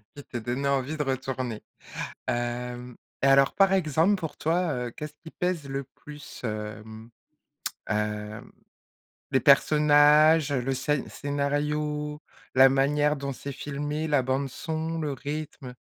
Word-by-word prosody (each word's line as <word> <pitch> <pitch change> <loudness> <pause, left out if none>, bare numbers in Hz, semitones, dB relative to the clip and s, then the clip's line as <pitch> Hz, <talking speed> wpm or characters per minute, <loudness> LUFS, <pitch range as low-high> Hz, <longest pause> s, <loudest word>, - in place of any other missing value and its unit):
qui 145 - -9
te 120 - -6
donnaient 125 +4 -2
envie 140 +3 0
de 150 - 0
retourner, 130 -3 -3 0.6
hem 120 0 -3 0.3
et 135 - +4
alors 135 0 +5
par 195 -1 +4
exemple 170 +2 +3
pour 165 -5 -6
toi, 170 0 +1
heu, - - -7
qu'est-ce 150 +4 -7
qui 160 - -10
pèse 180 -5 -2
le 135 0 -3
plus, 150 -1 -11
hem, 110 +1 -6 0.8
hem, 105 0 -3 0.8
les 130 - +4
personnages, 150 +2 +5
heu, 130 -3 +1
le 135 +2 -1
scé 140 +2 0
scénario, 150 +1 -2 0.3
la 135 +1 +8
manière 145 +2 +2
dont 140 -1 -4
c'est 140 +2 -7
filmé, 145 +3 -3
la 145 -3 +3
bande 130 +2 -1
son, 160 +3 -3
le 145 -2 -2
rythme, 140 -2 -6
140 Hz, 140 wpm, -27 LUFS, 130-150 Hz, 0.8 s, la